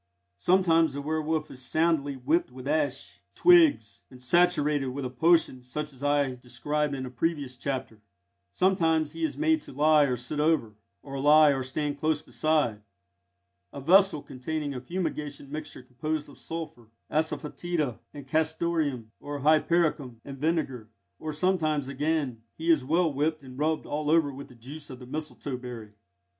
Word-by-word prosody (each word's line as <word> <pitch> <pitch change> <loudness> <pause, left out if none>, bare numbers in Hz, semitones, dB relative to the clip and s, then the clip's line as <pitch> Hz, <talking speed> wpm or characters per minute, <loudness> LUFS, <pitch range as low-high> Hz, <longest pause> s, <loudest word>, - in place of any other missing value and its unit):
Sometimes 165 - +3
the 140 - -3
werwolf 155 0 -1
is 130 - -8
soundly 155 0 +1
whipped 135 +3 0
with 130 +1 -9
ash 145 -3 -1
twigs, 320 - +5
and 130 - -14
saturated 150 0 +2
with 130 +1 -4
a 125 - -4
potion 160 -1 +3
such 150 +4 -5
as 130 +1 -12
I 145 -2 +2
described 140 +4 -2
in 130 -1 -4
a 125 - -7
previous 140 0 -2
chapter; 125 -4 -4 0.5
sometimes 160 - +2
he 165 +1 -6
is 160 - -1
made 320 0 +2
to - - -11
lie 150 +2 +4
or 125 -3 -1
sit 125 +5 -4
over, 150 -8 +2 0.3
or 135 -1 -6
lie 150 +2 +7
or 135 -2 +1
stand 145 +2 -3
close 155 0 +1
beside, 150 -9 0 0.9
a - - -7
vessel 180 +1 +4
containing 145 +3 -4
a 125 - -5
fumigation 150 -3 -4
mixture 150 -3 -6
composed 150 +4 -4
of 145 - -15
sulphur, 155 -8 -7 0.2
asafœtida, 155 -2 -2
and 145 -2 -10
castoreum, 155 -5 0
or 145 -1 -6
hypericum 155 -4 +2
and 135 -1 -8
vinegar; 140 -8 -1 0.3
or 155 - -4
sometimes, 155 -4 0
again, 140 -3 -1 0.2
he 165 +1 +2
is 155 -5 +3
well 165 +3 +2
whipped 155 +2 -1
and 130 0 -11
rubbed 155 +1 0
all 150 0 -2
over 155 -3 +3
with 140 +1 -9
the 125 - -16
juice 140 +6 -10
of 130 - -8
the 125 - -11
mistletoe 145 -1 -5
berry. 120 -4 -8
150 Hz, 160 wpm, -28 LUFS, 130-160 Hz, 0.9 s, lie